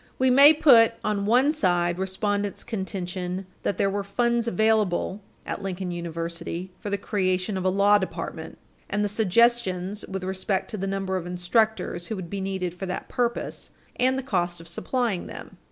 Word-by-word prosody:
We 260 0 +3
may 280 +4 +9
put 240 -7 +6
on 205 -1 -1
one 255 +6 +4
side 175 - +1
respondent's 205 +1 -1
contention 185 -3 -4 0.2
that - - -1
there - - +2
were 200 +1 -1
funds 235 +3 0
available 210 -2 +1 0.2
at - - -4
Lincoln 190 -2 -4
University 170 +1 -5
for 205 - -5
the 200 - 0
creation 190 -1 -1
of 190 -1 -3
a - - +4
law 200 +2 +4
department 190 - -5 0.3
and 210 0 0
the - - -1
suggestions 210 -2 +2
with 190 -1 -5
respect 190 +1 -2
to 215 - -4
the 195 0 -3
number 195 -1 -1
of 175 -1 -5
instructors 180 0 0
who 220 - -3
would 185 -4 -7
be 200 -1 -3
needed 190 -2 -2
for 190 +2 -6
that 180 - -5
purpose 240 -1 -2 0.3
and 260 +1 +2
the 265 - -3
cost 175 -8 -1
of 165 - -12
supplying 220 +3 -1
them. - - -10
195 Hz, 175 wpm, -25 LUFS, 180-220 Hz, 0.3 s, may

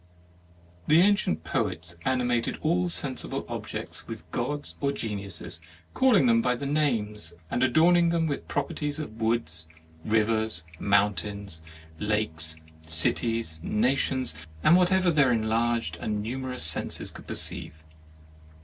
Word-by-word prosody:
The 155 +2 +6
ancient 185 - +2
poets 85 +1 -1
animated 125 -2 +1
all 175 +3 +2
sen 140 -5 +2
sible - - -3
objects - - -6
with - - -7
Gods 145 0 -2
or 140 0 +2
Geniuses, 100 -7 -5 0.3
calling 250 - +4
them 115 -1 +4
by 125 +1 +1
the 140 - -5
names 110 - -1 0.2
and 120 - 0
adorn 160 +7 +5
ing 170 -1 +4
them 165 -1 +1
with 145 -3 -3
properties 150 -3 -2
of 115 -8 -7
woods, 85 -9 -1 0.3
rivers, 110 -3 +1 0.2
mountains, 100 -3 0 0.4
lakes, 85 -7 -1 0.3
cities, 80 +3 +1
na 110 +9 +2
tions, 130 - -1 0.3
and 165 - +7
whatever 185 0 +4
their 145 -5 +4
enlarged 115 -4 0
and 105 +1 -2
numerous 130 -1 -4
senses 80 0 +2
could - - -12
perceive. 80 +1 -2
115 Hz, 130 wpm, -27 LUFS, 100-145 Hz, 0.4 s, and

